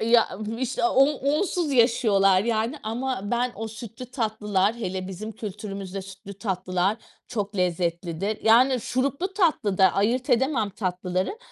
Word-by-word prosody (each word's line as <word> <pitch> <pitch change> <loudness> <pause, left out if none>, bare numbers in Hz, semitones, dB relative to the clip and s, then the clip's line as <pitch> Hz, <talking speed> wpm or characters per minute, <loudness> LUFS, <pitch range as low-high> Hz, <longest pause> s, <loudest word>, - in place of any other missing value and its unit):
Ya, 230 +1 +4 0.3
işte 260 -1 -1
o 265 +3 +5
onsuz 300 +3 0
yaşıyorlar 210 -6 +4
yani 230 +4 0
ama 245 +1 -2
ben 245 +1 0
o 225 0 -4
sütlü 225 +2 -9
tatlılar, 215 -4 0
hele 190 -4 -4
bizim 210 +4 -6
kültürümüzde, 200 -2 -6
sütlü 195 +1 -10
tatlılar 185 -1 -1 0.3
çok 205 -3 -3
lezzetlidir. 175 +2 -1
Yani, 250 +3 +5
şuruplu 275 - -1
tatlı 310 - +1
da, 190 -1 +6
ayırt 235 +6 0
edemem 240 -4 +2
tatlıları 185 - -2
220 Hz, 130 wpm, -25 LUFS, 195-250 Hz, 0.3 s, da